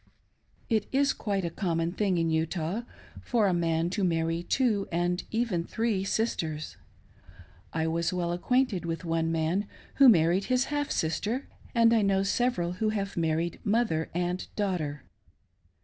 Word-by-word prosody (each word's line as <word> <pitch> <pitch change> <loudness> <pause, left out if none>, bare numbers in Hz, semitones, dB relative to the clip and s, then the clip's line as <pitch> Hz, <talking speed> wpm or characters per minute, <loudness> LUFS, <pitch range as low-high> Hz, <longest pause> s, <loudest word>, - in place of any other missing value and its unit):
It 220 -3 +1
is 275 +1 +3
quite 200 -4 -2
a 170 - -2
conynon 170 -2 -1
thing 195 -3 +1
in 165 -1 +1
Utah 165 +5 -1 0.4
for 230 -4 +1
a 185 - +2
man 165 0 0
to 200 +1 -1
marry 165 -1 +1
two 210 +1 +1
and 175 +2 0
even 220 -7 0
three 220 -1 -1
sisters. 165 -8 -2 1.0
I 160 0 -1
was 165 +1 0
well 175 -2 -1
acquainted 225 +2 +1
with 165 +1 -4
one 165 0 0
man 165 +5 0 0.3
who 275 -2 +9
married 175 0 +4
his 255 0 +2
half 290 0 -1
sister; 205 - -1 0.3
and 230 0 +5
I 225 - +4
know 195 -1 +2
several 200 -4 0
who 215 +4 -1
have 200 -2 -3
married 165 0 -1
mother 205 -7 +1
and 180 +1 -1
daughter. 175 -8 -2
180 Hz, 150 wpm, -28 LUFS, 165-220 Hz, 1.0 s, who